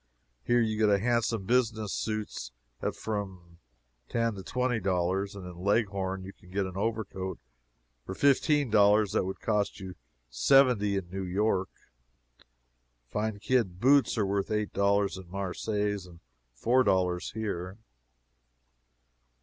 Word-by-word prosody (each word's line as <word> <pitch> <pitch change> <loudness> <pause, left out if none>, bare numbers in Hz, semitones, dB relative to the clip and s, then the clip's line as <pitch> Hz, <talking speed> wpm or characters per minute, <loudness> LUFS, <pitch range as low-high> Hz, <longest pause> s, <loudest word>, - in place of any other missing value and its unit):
Here 120 - +3
you 110 -1 0
get 105 -2 +4
handsome 115 -2 0
business 110 -3 +1
suits 105 - -4 0.3
at - - -2
from 95 -5 -6 0.5
ten 115 -1 0
to 100 - -7
twenty 125 +3 -1
dollars, 95 +1 0
and 95 -2 -8
in 90 -1 -9
Leghorn 95 -2 0
you 95 +1 -9
can 90 - -20
get 100 +1 -1
an 95 -1 -7
overcoat 100 -3 -3 0.7
for 95 - -6
fifteen 140 - +3
dollars 105 -1 +5
that 110 - +1
would 95 - -5
cost 105 -2 0
you 95 -1 -7 0.3
seventy 105 - +4
in 90 -2 -5
New 95 +1 -4
York. 95 +1 0 1.4
Fine 105 0 -2
kid 110 -9 +1
boots 135 +2 +4
are 105 - +2
worth 100 0 -1
eight 105 -1 -1
dollars 100 0 +2
in 90 -2 -12
Marseilles 100 +1 -2
and 85 -1 -15 0.4
four 125 - +3
dollars 90 -4 +1
here. 100 -3 -4
100 Hz, 135 wpm, -29 LUFS, 95-110 Hz, 1.4 s, dollars